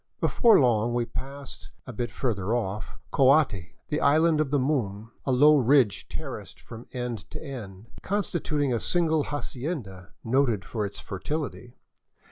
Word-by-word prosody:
Before 230 -4 +5
long 120 -3 +2
we 120 -1 +1
passed, 135 +3 -8 0.2
a - - -8
bit 120 +2 -3
further 110 -3 -1
off, 105 -3 -4
Coati, 130 - +3
the 150 - -1
Island 155 +2 +4
of 150 - -1
the 145 - +2
Moon, 115 -6 -1 0.2
a - - +2
low 150 +4 +6
ridge 130 -5 +3
terraced - - -7
from 115 +1 -11
end 125 -5 -5
to - - -7
end, 110 -9 -8 0.2
constituting 160 -8 -1
a 115 - 0
single 160 -2 +1
hacienda 125 - -5
noted 120 -4 +1
for 105 -3 -2
its 100 - -8
fertility. 120 - -5
125 Hz, 145 wpm, -26 LUFS, 110-145 Hz, 0.2 s, low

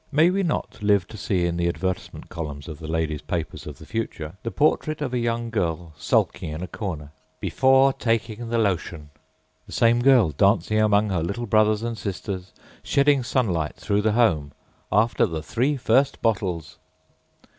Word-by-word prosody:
May 155 +4 +4
we 195 +1 0
not 165 - -2
live 100 -3 +2
to - - -10
see 95 -4 0
in 85 0 -1
the 85 0 +1
advertisement 90 +2 -3
columns 75 -3 -6
of 80 -2 -8
the 80 - -8
ladiesâ 80 -2 -2
paper - - -2
of - - -10
the - - -13
future 85 -8 -4
the 115 - -3
portrait 155 +3 +1
of 140 -4 -3
a 125 - +1
young 115 0 -1
girl 85 -6 -2
sulking 80 0 0
in 80 +3 -5
a - - -4
cornerââBefore 105 - 0
taking 115 0 -1
the 115 - 0
lotion!â 85 -7 -1 0.6
The - - -13
same 115 +1 +3
girl 125 - +5
dancing 105 +6 +2
among 105 0 +3
her 90 -3 0
little 100 +8 -3
brothers 110 0 +3
and 115 0 -2
sisters, 95 -3 -5 0.3
shedding 140 -1 +3
sunlight 95 - -1
through 100 0 0
the 110 0 +1
homeââAfter 105 - 0
the 80 -1 -4
three 130 - 0
first 130 +2 +2
bottles! 95 -8 -1
105 Hz, 165 wpm, -24 LUFS, 85-120 Hz, 0.6 s, girl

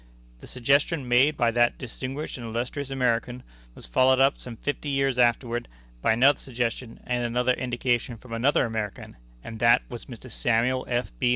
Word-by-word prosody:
"The - - -12
suggestion 140 +3 +1
made 130 +5 +4
by 120 -2 +2
that 120 +1 +2
distinguished 130 +4 -6
and 120 -3 -7
illustrious 125 +5 -4
American 125 -1 -1 0.3
was - - -9
followed 130 - +3
up 135 +1 +3
some 120 -2 -7
fifty 145 +3 -3
years 135 -2 0
afterward 120 0 +1 0.3
by 110 - +3
another 135 +5 +4
suggestion 120 -1 -4
and 125 -1 -1
another 125 +2 +1
indication 120 -1 -1
from 120 +1 -11
another 125 +4 +2
American, 110 - -5 0.3
and 115 -1 -8
that 115 +1 +5
was 120 -2 -8
Mr. 130 -1 -11
Samuel 125 +2 0
F. 120 0 -1
B. 125 - +2
125 Hz, 170 wpm, -26 LUFS, 120-130 Hz, 0.3 s, that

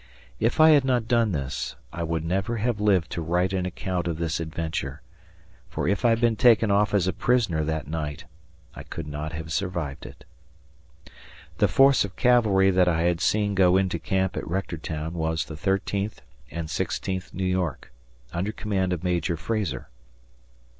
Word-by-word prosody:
If - - 0
I 155 0 +8
had 145 -3 +5
not 125 -4 +1
done 115 -3 +2
this, 70 -3 -3 0.2
I 85 - -5
would 80 -1 -2
never 95 +7 -1
have 110 -1 -1
lived 95 -6 +2
to 85 - -3
write 90 +3 0
an 90 -1 -1
account 90 -1 -3
of 85 -2 -2
this 80 -1 -2
adventure, 80 -4 -4 0.7
for - - -2
if 100 +2 0
Ihad 115 -1 +4
been 120 -1 +3
taken 110 -1 +5
off 105 +1 +2
as 95 -4 +3
a 95 - +1
prisoner 110 -11 +1
that 80 -2 -3
night, 75 -2 -4 0.5
I - - -9
could 80 - -7
not 75 +1 -5
have 80 0 -5
survived 85 -5 -3
it. - - -14 1.4
The - - +5
force 135 0 +5
of 100 -1 -7
cavalry 110 -7 +4
that 90 -1 +3
I 85 -2 +2
had 85 0 +1
seen 105 0 +1
go 95 -1 +4
into 95 -1 0
camp 95 -1 -1
at - - -4
Rectortown 80 -3 -3
was 80 -1 -1
the 80 - -8
Thirteenth 100 +4 -2 0.3
and 85 -1 -5
Sixteenth 95 +3 -3
New 95 - -3
York, 90 -5 -2 0.4
under 95 +5 -1
command 95 -4 -1
of 90 -1 -4
Major 85 -2 0
Frazar. 100 - -3
90 Hz, 175 wpm, -25 LUFS, 80-105 Hz, 1.4 s, I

